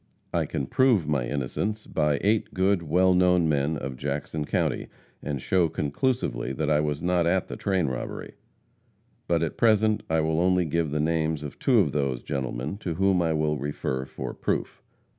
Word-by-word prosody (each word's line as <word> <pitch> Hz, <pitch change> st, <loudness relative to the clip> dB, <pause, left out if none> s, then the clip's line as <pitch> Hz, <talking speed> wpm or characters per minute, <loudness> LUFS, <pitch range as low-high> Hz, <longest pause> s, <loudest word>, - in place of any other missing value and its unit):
I -, -, +1 dB
can 70 Hz, -, -2 dB
prove 120 Hz, -, +3 dB
my 70 Hz, -5 st, 0 dB
innocence 85 Hz, +10 st, -2 dB
by 75 Hz, -2 st, +1 dB
eight 105 Hz, +2 st, +1 dB
good, 95 Hz, 0 st, +2 dB
well 90 Hz, +4 st, +3 dB
known 90 Hz, -2 st, +4 dB
men 75 Hz, +1 st, +1 dB
of 65 Hz, -3 st, -5 dB
Jackson 75 Hz, +2 st, -3 dB
county, -, -, -1 dB, 0.3 s
and 70 Hz, -2 st, -3 dB
show 85 Hz, +4 st, +2 dB
conclusively 70 Hz, -, -1 dB
that 65 Hz, -, -1 dB
I 75 Hz, -, +4 dB
was 75 Hz, 0 st, -2 dB
not 90 Hz, -1 st, +2 dB
at 90 Hz, +1 st, +1 dB
the -, -, -5 dB
train 95 Hz, -4 st, 0 dB
robbery. 65 Hz, -3 st, -5 dB, 0.9 s
But 85 Hz, -1 st, +2 dB
at 80 Hz, -, -3 dB
present 110 Hz, -1 st, +3 dB
I 80 Hz, 0 st, +2 dB
will 80 Hz, +1 st, 0 dB
only 90 Hz, 0 st, +3 dB
give 80 Hz, 0 st, 0 dB
the 75 Hz, +1 st, -1 dB
names 80 Hz, -1 st, 0 dB
of 75 Hz, -, -8 dB
two 125 Hz, -4 st, +4 dB
of 75 Hz, -7 st, 0 dB
those 70 Hz, -4 st, -1 dB
gentlemen 65 Hz, +4 st, -3 dB
to 85 Hz, -6 st, -3 dB
whom 95 Hz, 0 st, +2 dB
I 80 Hz, -1 st, +1 dB
will 75 Hz, -1 st, 0 dB
refer 65 Hz, -2 st, -3 dB
for -, -, -6 dB
proof. -, -, -3 dB
80 Hz, 180 wpm, -26 LUFS, 70-90 Hz, 0.9 s, known